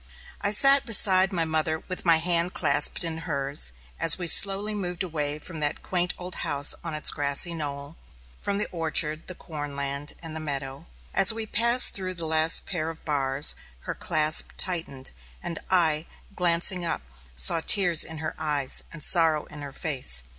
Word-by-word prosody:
I 200 - 0
sat 275 +6 +7
beside 195 -4 +3
my 170 -3 -1
mother 160 0 -2
with 185 0 -7
my 165 -2 +4
hand 170 +1 -1
clasped - - +2
in 165 -1 -5
hers, 140 - 0 0.3
as 165 - +2
we 180 - -6
slowly 200 +4 +4
moved 180 -3 -4
away 150 -4 -3
from 160 +1 -10
that 150 0 -2
quaint 180 -1 -1
old 180 0 -8
house 145 +1 +4
on 165 -2 -4
its 150 - 0
grassy 145 +3 +1
knoll, 145 -1 -7 0.4
from 200 - -3
the 210 - -2
orchard, 160 -1 0
the 185 - -6
corn 145 -4 -9
land, 140 +1 -4
and 160 -1 -6
the - - -3
meadow; 135 - -6 0.3
as 195 - +4
we 220 0 -5
passed 235 +3 +2
through 185 -1 -5
the 170 -1 -4
last 160 +1 +3
pair 165 -4 -4
of 165 - -10
bars, 140 -1 +2 0.3
her - - -6
clasp 155 0 +1
tightened, 160 -8 -3 0.3
and 170 -2 -5
I, 160 -4 +1 0.3
glancing 175 +1 +1
up, 165 - -3 0.3
saw 65 - +3
tears 175 -5 +4
in 160 - -8
her 155 0 -6
eyes 145 -4 0
and 155 -3 -7
sorrow 160 -4 +2
in 150 - -11
her 140 -1 -9
face. 130 - -1
160 Hz, 175 wpm, -24 LUFS, 150-180 Hz, 0.4 s, sat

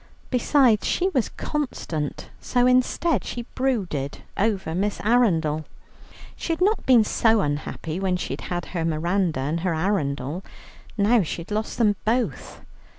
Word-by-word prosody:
Besides 250 -3 +3
she 370 +2 +1
was 260 - 0
constant, 170 - -4
so 245 -1 +1
instead, 255 +6 +2
she 240 -1 -5
brooded 190 - -2
over 195 -5 0
Miss 200 +4 -1
Arundel. 170 -10 +2 0.7
She - - -4
had 325 - -4
not 410 +4 +1
been 245 -4 +7
so 225 0 +3
unhappy, 155 +2 -3
when 190 -2 0
she - - -3
had 175 -1 -4
her 170 -3 -1
Miranda 165 0 0
and 150 +5 -1
her 175 -1 0
Arundel. 160 -3 -1 0.5
Now 220 +3 +4
she 170 0 -3
had 180 - -17
lost 215 +1 -2
them 210 -4 +3
both. 235 +3 -1
200 Hz, 145 wpm, -24 LUFS, 165-245 Hz, 0.7 s, been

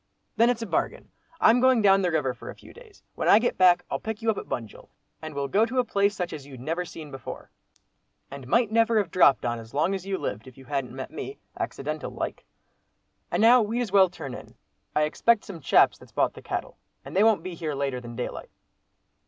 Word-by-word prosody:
"Then 230 +2 +4
it's 235 -2 -1
a - - -3
bargain. - - -2 0.3
I'm 235 +2 +5
going 255 -3 +4
down 195 -1 +5
the 180 - +1
river 150 -6 0
for - - -11
a - - -8
few - - -16
days. 465 -4 -17
When - - -3
I - - +8
get 240 +2 +1
back, 180 -1 +5
I'll - - -1
pick 220 0 -6
you 225 - +3
up 215 - -6
at - - -11
Bunjil, 115 -3 -6 0.3
and 155 -2 -7
we'll 140 0 -2
go 205 +10 +3
to 235 +3 -2
a 250 - +4
place 200 -3 +1
such 180 -2 -3
as 150 -3 -7
you 135 -1 -11
never 165 +8 -3
seen 155 -3 -10
before, 135 -4 -9 0.8
and 135 -2 -9
might 230 - +2
never 230 0 +3
have 200 -6 0
dropped 145 -9 +4
on 120 -1 -1
as 115 +3 -12
long 165 +6 +2
as 190 -2 -4
you 195 -1 -1
lived, 105 - -5
if 130 - -14
you 135 - -14
hadn't 135 -3 -3
met 135 +2 -6
me, 400 - -7 0.2
accidental - - -4
like. - - -5 0.8
And - - 0
now 240 +2 +7
we'd 225 +3 -1
as 230 -6 -3
well 195 -2 +6
turn 135 -7 -8
in. - - -11 0.4
I 150 - +3
expect 215 +9 +2
some 185 -5 -8
chaps 135 - +4
that's - - -16
bought - - +1
the - - -12
cattle, - - -5 0.3
and - - -9
they 195 - +5
won't 220 -7 +3
be 185 0 -5
here 160 -3 -4
later 135 -2 -2
than 120 -1 -9
daylight." - - -5
180 Hz, 235 wpm, -26 LUFS, 140-220 Hz, 0.8 s, I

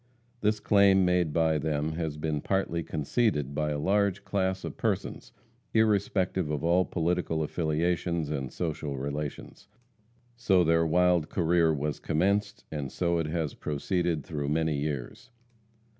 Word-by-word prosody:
This 105 0 +1
claim, 100 -2 +4
made 90 -3 +2
by 80 -1 +2
them, 75 +1 -1
has 80 -2 -3
been 75 -1 -2
partly 95 -3 -1
conceded 75 - -1
by 75 +1 -1
a 75 - -1
large 100 +4 +1
class 95 -1 -1
of - - -5
persons, - - -3 0.4
irrespective 100 -5 +1
of 75 0 -2
all 90 +2 +3
political 85 -2 -1
affiliations 85 0 -1
and 65 -4 -3
social 75 -4 -3
relations. 70 +2 -5 0.7
So 100 -7 +3
their 85 0 +3
wild 90 -1 +3
career 85 -1 +2
was 75 0 -2
commenced, 100 +5 0
and 75 -4 -4
so 85 -1 0
it 80 - -1
has 80 -2 -2
proceeded 85 +1 -1
through 70 -3 -3
many 80 0 +1
years. 70 - -4
80 Hz, 140 wpm, -28 LUFS, 75-95 Hz, 0.7 s, claim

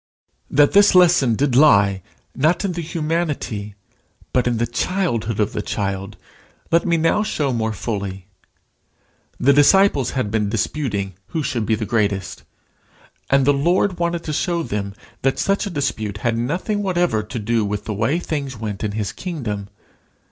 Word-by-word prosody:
That 145 0 +4
this 205 -1 +5
lesson 170 -10 +5
did 135 +1 +1
lie, 100 -9 +5 0.3
not 165 +8 +1
in 195 - 0
the 170 -1 -4
humanity, 150 - -3 0.6
but 125 -1 +2
in 120 -1 +1
the 120 - +1
childhood 120 - -1
of 105 0 0
the 105 - -2
child, 100 -1 -3 0.5
let 170 +2 +3
me 170 -1 +3
now 165 +6 +2
show 145 -10 -1
more 110 -1 -1
fully. 100 -3 -4 1.1
The 140 +3 +4
disciples 145 - +4
had 110 -6 -1
been 105 -2 0
disputing 105 -3 -2
who 160 - -3
should 115 -5 -2
be 110 - +2
the 110 0 -3
greatest, 100 -4 -1 0.9
and 135 -1 +3
the 145 - +4
Lord 175 +6 +1
wanted 170 0 -1
to 155 - -4
show 170 +2 0
them 100 -5 -4 0.3
that 135 0 +1
such 200 +2 0
a - - -3
dispute 110 - -2
had 115 -1 +2
nothing 180 - -1
whatever 175 - +1
to 110 +4 -7
do 115 +1 0
with 105 0 -3
the 110 - -3
way 115 +10 0
things 140 -7 -4
went 105 -2 -5
in 105 -1 -2
his 105 -1 -2
kingdom. 110 - -5
125 Hz, 165 wpm, -21 LUFS, 105-165 Hz, 1.1 s, this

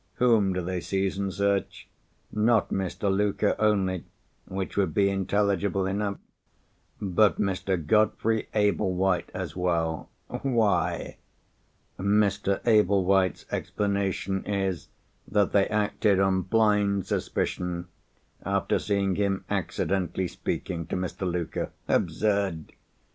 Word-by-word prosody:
Whom 115 -6 +3
do 90 -1 -2
they 90 0 -3
seize 95 +1 -1
and 100 -1 -1
search? 100 +1 -1 0.4
Not 110 0 +2
Mr. 95 +1 -1
Luker 100 0 +1
only—which 95 -2 -2
would 95 -6 0
be 100 -1 +3
intelligible 100 0 0
enough—but 100 0 -2
Mr. 95 -4 -1
Godfrey 110 +4 +2
Ablewhite 95 -3 +1
as 90 -4 -4
well. 85 -3 -1 0.2
Why? 115 -6 0 0.8
Mr. 100 0 +1
Ablewhite's 95 -5 +3
explanation 100 -1 -1
is, 95 -6 -1 0.4
that 105 -2 +2
they 100 -1 +3
acted 105 -1 +1
on 95 -1 +2
blind 100 -1 +2
suspicion, 90 0 -2 0.6
after 100 +1 0
seeing 100 -2 0
him 100 -1 0
accidentally 95 -1 -1
speaking 85 -1 -4
to - - -3
Mr. 90 0 -2
Luker. 85 -2 -3 0.2
Absurd! 100 -6 0
100 Hz, 100 wpm, -27 LUFS, 95-105 Hz, 0.8 s, Whom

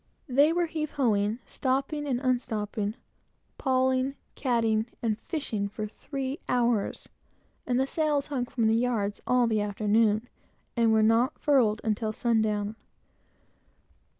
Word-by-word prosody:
They 285 +4 +4
were 345 +1 +1
heave 315 -2 -4
ho 245 -7 +2
ing, 205 +2 0
stopping 275 +3 -1
and 250 -3 0
unstopping, 220 -4 -1 0.6
pawling, 260 0 +1 0.2
catting, 230 -4 +1 0.2
and 220 -2 +1
fishing, 230 - -3
for 215 +1 -4
three 270 +5 -5
hours; 235 -4 0 0.6
and 245 0 +1
the 265 - +3
sails 295 -1 0
hung 265 -4 -2
from 235 -2 -1
the 220 - +4
yards 225 -4 0
all 250 -1 +4
the 220 -2 +1
afternoon, 215 +2 +1 0.5
and 230 -2 +3
were 220 0 +4
not 230 +5 +3
furled 240 -7 +3
until 215 0 -1
sundown. 215 -2 0
235 Hz, 130 wpm, -28 LUFS, 215-265 Hz, 0.6 s, They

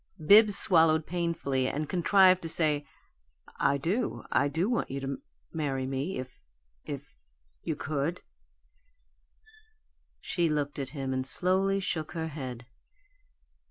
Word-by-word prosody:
Bibbs 205 +2 +7
swallowed 160 -3 +5
painfully 165 -7 -2
and 150 +3 -3
contrived 185 +1 +4
to 165 - -5
say, 150 -3 0 0.7
"I 140 - +2
do 190 - -2
I 140 - +2
do 160 +7 -1
want 240 0 -1
you 135 - -4
to 135 0 -5 0.3
marry 135 -4 -2
me, 135 +7 -3
if 130 0 -9 0.4
if - - -9 0.4
you - - -3
could." 155 +4 -3 2.0
She 170 -2 -1
looked 145 -1 -2
at 135 - -3
him, 135 -1 -3
and 130 0 -1
slowly 190 +7 +2
shook 165 -5 -3
her 160 -1 -4
head. 130 -5 -7
155 Hz, 125 wpm, -28 LUFS, 140-180 Hz, 2.0 s, Bibbs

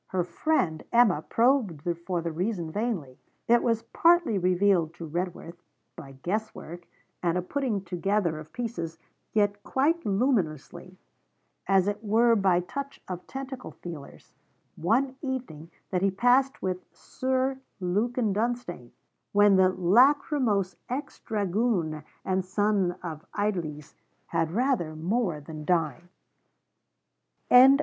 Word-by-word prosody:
Her 185 -2 0
friend 175 - 0
Emma 230 -10 +4
probed 230 - +1 0.2
for 175 -3 -1
the 170 - -2
reason 175 -1 -2
vainly. 190 - -3 0.3
It 240 0 +5
was 230 -1 +1
partly 335 - +3
revealed 180 -2 +2
to 170 - -7
Redworth, 175 +1 -5 0.3
by 135 -2 -10
guess 215 +4 -2
work 175 +2 -9 0.3
and 175 0 +1
a - - +1
putting 235 -3 -2
together 180 -2 0
of 155 +1 -11
pieces, 170 -10 -4 0.3
yet 205 -1 +1
quite 315 +9 +1
luminously, 195 - -1 0.7
as 195 -1 +4
it 205 +1 -2
were 230 +2 +4
by 190 -4 +3
touch 280 +10 -6
of 180 -1 -6
tentacle 265 -1 -7
feelers 165 -5 -9 0.4
one 255 +10 +1
evening 245 - -5 0.2
that 180 -2 0
he 195 - +3
passed 245 +7 +2
with 185 -1 0
Sir 260 +8 -2 0.2
Lukin 210 +4 0
Dunstane, 215 - -3 0.4
when 205 -1 +6
the 190 0 +5
lachrymose 215 - +3
ex 260 +4 -4
dragoon 200 -7 -1 0.2
and 190 0 0
son 200 -1 +1
of 160 -3 -6
Idlesse, 170 -8 -2 0.3
had 160 - 0
rather 220 - 0
more 175 0 -1
than 155 +1 -8
dined. 165 0 0
195 Hz, 125 wpm, -27 LUFS, 170-240 Hz, 0.7 s, when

